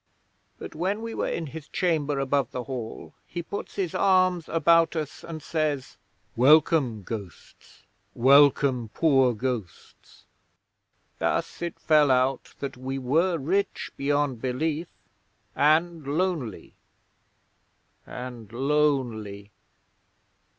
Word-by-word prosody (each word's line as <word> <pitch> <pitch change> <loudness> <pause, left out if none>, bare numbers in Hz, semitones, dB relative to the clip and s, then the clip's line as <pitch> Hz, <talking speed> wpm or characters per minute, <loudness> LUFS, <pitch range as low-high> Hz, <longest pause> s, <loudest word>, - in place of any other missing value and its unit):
but - - -9
when 195 +7 -2
we 230 0 -5
were - - -2
in 165 - -3
his 155 +1 -9
chamber 155 -6 0
above 135 -2 0
the 125 - -5
Hall 120 -4 -7
he 175 0 -5
puts 200 - -7
his 185 -5 -2
arms 185 -3 +2
about 165 +1 +3
us 155 -3 -5
and 160 -2 -8
says, 150 -4 -2 0.4
"Welcome, 135 -4 +4
ghosts! 100 -6 -10 0.3
Welcome, 135 -2 +4
poor 135 -6 +3
ghosts!"... 115 -7 -6 0.9
Thus - - -1
it 170 -1 -4
fell 150 -2 +4
out 130 +1 +1
that 140 -2 -5
we 130 +1 -4
were 160 +8 +1
rich 190 +8 -1
beyond 145 -3 0
belief, 150 +6 -2 0.7
and 155 +1 +2
lonely. 155 - -2 1.3
And 120 -4 -8
lonely!' 120 -7 -1
145 Hz, 110 wpm, -26 LUFS, 125-165 Hz, 1.3 s, Welcome